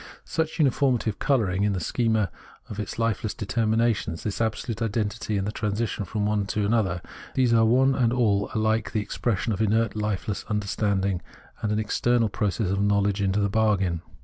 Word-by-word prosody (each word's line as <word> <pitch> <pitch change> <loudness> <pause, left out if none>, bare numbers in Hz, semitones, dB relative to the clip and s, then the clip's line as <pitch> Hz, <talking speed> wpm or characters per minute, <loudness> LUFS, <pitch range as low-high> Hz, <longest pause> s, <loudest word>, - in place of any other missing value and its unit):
Such 160 -1 -2
uniformity 130 -6 +2
of - - -16
colouring 105 -9 +1
in 105 -1 +2
the 95 - -1
schema 110 0 0 0.4
with 105 - -7
its 105 - -4
hfeless 115 -2 -1
determinations, 110 -4 0
this 105 +1 -3
absolute 115 +1 -2
identity, 110 -1 -1
and 95 - -1
the 105 - -2
transition 105 -1 -2
from 105 +1 -2
one 105 -1 0
to 105 0 0
the 115 - +2
other 95 -6 0 0.2
— - - -16
these 125 -3 +3
are 115 -1 +5
one 130 +4 +4
and 120 -3 +2
all 105 -5 +2
alike 110 0 0
the 110 - +1
expression 110 +1 -1
of 105 - -2
inert 110 +1 +2
Hfeless 105 -2 -2
understanding, 100 -3 0 0.4
and 105 - -1
an 105 - +1
external 115 +2 +1
process 100 -1 -1
of 100 +1 0
knowledge 100 0 +2
into 100 +1 +1
the 100 - +2
bargain. 100 -5 +1
105 Hz, 185 wpm, -25 LUFS, 100-115 Hz, 0.4 s, are